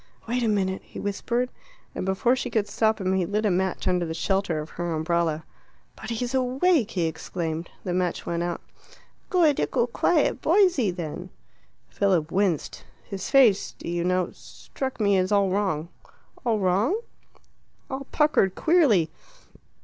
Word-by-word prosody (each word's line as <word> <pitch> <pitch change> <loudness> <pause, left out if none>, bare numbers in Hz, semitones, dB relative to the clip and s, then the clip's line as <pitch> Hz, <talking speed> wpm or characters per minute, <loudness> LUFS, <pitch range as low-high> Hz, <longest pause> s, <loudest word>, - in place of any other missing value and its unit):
"Wait 245 +2 0
a 235 - +1
minute," 190 -3 0
he - - -10
whispered, 235 +5 -1 0.4
and 185 - -4
before 190 +6 +2
she 250 -1 -3
could 220 -3 0
stop 220 +1 +1
him 190 -1 0
he 190 - +2
had 175 - -2
lit 210 +1 0
a 205 - +3
match 185 +1 -1
under 180 -1 +2
the 160 -1 -4
shelter 195 -2 0
of 155 +1 -7
her 175 -1 -3
umbrella. 160 0 0 0.5
"But 220 - -9
he's 240 +2 -2
awake!" 260 - +2
he 180 -6 -1
exclaimed. 165 0 -4
The 180 - -2
match 180 -1 -1
went 170 0 -2
out. 175 0 -3 0.7
"Good 325 -6 +3
ickle 240 -3 +1
quiet 295 +6 +1
boysey, 350 - +3
then." 175 0 -5 0.6
Philip 180 -6 +1
winced. 185 -5 0 0.2
"His 195 -2 -6
face, 250 -8 +4
do - - -9
you 170 0 -1
know, 180 0 +1
struck 265 -2 -7
me 200 -3 +3
as 185 +1 0
all 200 -2 +3
wrong." 185 -5 -1 0.5
"All 230 -4 +1
wrong?" 205 - +1 0.9
"All 270 +1 -5
puckered 300 - +3
queerly." 280 - +3
195 Hz, 160 wpm, -25 LUFS, 175-245 Hz, 0.9 s, face